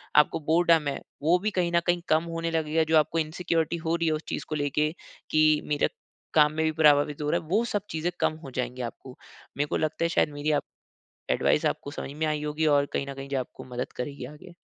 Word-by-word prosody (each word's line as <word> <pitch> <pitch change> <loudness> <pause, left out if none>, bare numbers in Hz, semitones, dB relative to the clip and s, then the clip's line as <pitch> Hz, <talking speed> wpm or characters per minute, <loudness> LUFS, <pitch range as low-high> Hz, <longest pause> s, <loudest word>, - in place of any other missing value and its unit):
आपको 150 - +5
बोरडम 165 -2 +4
है, 140 - -2 0.2
वो 170 +4 +5
भी 215 +3 -1
कहीं 175 -1 +1
न - - +6
कहीं 175 0 +2
कम 155 +1 +4
होने 165 0 -2
लगेगा। 160 0 +1
जो - - +7
आपको 155 +2 +2
इनसिक्योरिटी 165 +1 -1
हो 165 - +2
रही 170 -1 0
है 160 - +2
उस 155 +1 -3
चीज़ - - -3
को 155 - -2
लेके 150 +1 0 0.4
कि 155 -1 +4
मेरे 145 -1 +1 0.4
काम 150 -1 +5
में 160 +1 0
भी 160 - +2
प्रभावित 150 -2 +4
हो 150 - -1
रहा - - +1
है, 160 - -15
वो 205 +8 +2
सब 205 -3 -1
चीज़ें 160 +2 -1
कम - - +2
हो 135 - -8
जाएँगी 125 0 -3
आपको। 125 +2 -7 0.4
मेरे 145 +1 +1
को 160 - -1
लगता 155 +1 -1
है, - - +1
शायद 165 - +2
मेरी 145 +1 -1
आप - - -14 0.7
एडवाइज़ - - +2
आपको 145 - -3
समझ 140 - -6
में 155 +2 -1
आई 150 -1 -1
होगी, 150 +1 -1
और 145 -2 +4
कहीं 140 - -1
न - - -4
कहीं 135 0 -8
जो 135 -1 0
आपको 125 - -7
मदद 125 - -3
करेगी 135 0 -5
आगे। 175 +4 -14
155 Hz, 240 wpm, -27 LUFS, 145-165 Hz, 0.7 s, जो